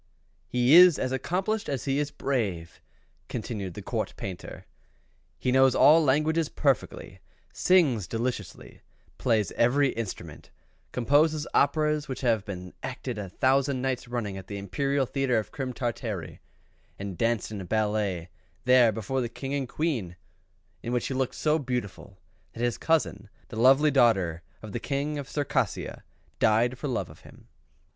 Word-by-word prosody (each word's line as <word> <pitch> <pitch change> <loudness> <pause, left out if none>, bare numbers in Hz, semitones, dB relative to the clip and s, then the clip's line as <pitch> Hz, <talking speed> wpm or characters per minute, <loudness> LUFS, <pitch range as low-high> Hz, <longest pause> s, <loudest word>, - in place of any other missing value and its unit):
"He 125 +3 +2
is 180 -2 +9
as 130 - -2
accomplished 185 +11 -1
as 135 -4 -3
he 135 0 +1
is 150 0 -1
brave," 100 -12 -3 0.5
continued 105 -6 -5
the - - -7 0.3
Painter. 95 -2 -7 0.7
"He 125 - -1
knows 130 0 +5
all 160 +2 +6
languages 155 +3 +2
perfectly: 135 -6 -1 0.3
sings 145 - +3
deliciously: 115 -3 -5 0.4
plays 110 -6 +1
every 135 +4 +3
instrument: 115 -5 -6 0.4
composes 150 +5 +2
operas 150 +1 +2
which 130 - -5
have 115 -5 +2
been 90 -3 -7
acted 125 -3 -5
a 100 -2 -5
thousand 135 +3 +1
nights 130 -2 -2
running 115 -5 -3
at 95 -1 -9
the 100 - -5
Imperial 135 +8 -1
Theatre 135 -1 0
of 105 -2 -3
Crim 130 -2 -4
Tartary, 110 - -4 0.6
and 100 -2 -6
danced 115 +2 0
in 105 -2 -5
a - - -7
ballet 105 -4 -1 0.4
there 125 -2 +6
before 110 +5 -2
the 120 - -2
King 135 +3 -6
and 135 -3 -2
Queen; 125 - -2 0.7
in 120 - -4
which 125 - -1
he - - -2
looked 130 -1 -1
so 155 +1 +1
beautiful, 125 - -5 0.4
that 115 - -5
his 120 -1 0
cousin, 115 -11 0 0.2
the - - -8
lovely 135 +4 +6
daughter 95 - +3 0.2
of 110 - -8
the 120 - -3
King 145 +3 -2
of 140 - -7
Circassia, 145 -1 -2 0.4
died 120 +3 +2
for 145 - -3
love 125 - -2
of - - -16
him." - - -17
125 Hz, 150 wpm, -27 LUFS, 105-140 Hz, 0.7 s, is